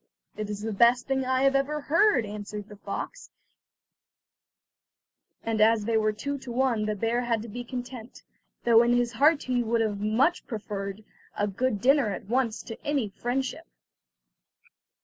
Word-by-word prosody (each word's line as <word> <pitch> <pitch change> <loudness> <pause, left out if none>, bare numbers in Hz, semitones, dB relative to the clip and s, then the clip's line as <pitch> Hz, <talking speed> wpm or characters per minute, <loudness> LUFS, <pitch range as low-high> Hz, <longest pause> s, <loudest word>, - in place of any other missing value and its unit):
"It 215 -1 -4
is 205 -1 -4
the 220 0 -3
best 235 +4 +4
thing 265 -1 0
I 260 +1 +1
have 275 0 +4
ever 295 +2 0
heard," 320 - +3
answered 210 0 -7
the 210 - -10
fox; 205 - -6 2.1
and 225 -1 -1
as 220 -1 +4
they 230 0 0
were 215 -1 +3
two 280 +7 -4
to 255 - -8
one 235 -4 +1
the 215 - -1
bear 230 +4 0
had 230 -3 -1
to - - -8
be 245 +3 -6
content, 245 -1 -8 0.4
though 230 -1 +6
in 240 0 +3
his 245 -1 +2
heart 290 +6 +3
he 250 -1 0
would 220 -3 0
much 235 +11 +2
have - - -34
preferred 205 -2 -5 0.3
a 205 - +1
good 205 +1 -1
dinner 270 -2 +4
at 195 - -5
once 235 0 0
to 225 - -9
any 280 -7 0
friendship. 245 - -3
235 Hz, 170 wpm, -27 LUFS, 215-260 Hz, 2.1 s, though